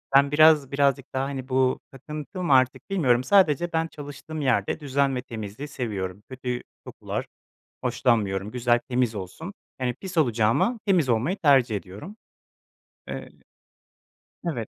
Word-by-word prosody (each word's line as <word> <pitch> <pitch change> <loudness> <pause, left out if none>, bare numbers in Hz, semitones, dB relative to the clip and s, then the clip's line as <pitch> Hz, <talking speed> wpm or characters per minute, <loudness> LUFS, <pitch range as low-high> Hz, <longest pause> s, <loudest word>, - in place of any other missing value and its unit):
ben 140 +1 +6
biraz 155 -2 +5
birazcık 140 -1 +1
daha, 130 0 0
hani, 135 -1 -5
bu 130 0 +2
takıntı 150 +7 -7
mı 150 - +3
artık 130 0 +2
bilmiyorum, 130 -11 +2
sadece 175 -1 +3
ben 165 0 +1
çalıştığım 150 +1 -8
yerde 125 -5 +1
düzen 140 -2 0
ve 125 - -2
temizliği 115 +2 -7
seviyorum. 105 -8 -4
Kötü 125 -1 -4 0.2
kokular - - -5 0.6
hoşlanmıyorum, 110 -5 +1
güzel, 120 0 +2
temiz 125 -3 +1
olsun. 105 - -7 0.3
Yani, 125 -1 0
pis 185 +6 -8
olacağıma 120 - +2
temiz 175 -9 +3
olmayı 125 - +1
tercih 135 -7 +4
ediyorum. 105 - -10 0.9
Eee - - -6 1.2
Evet, 115 -7 -4
130 Hz, 135 wpm, -25 LUFS, 120-150 Hz, 1.2 s, ben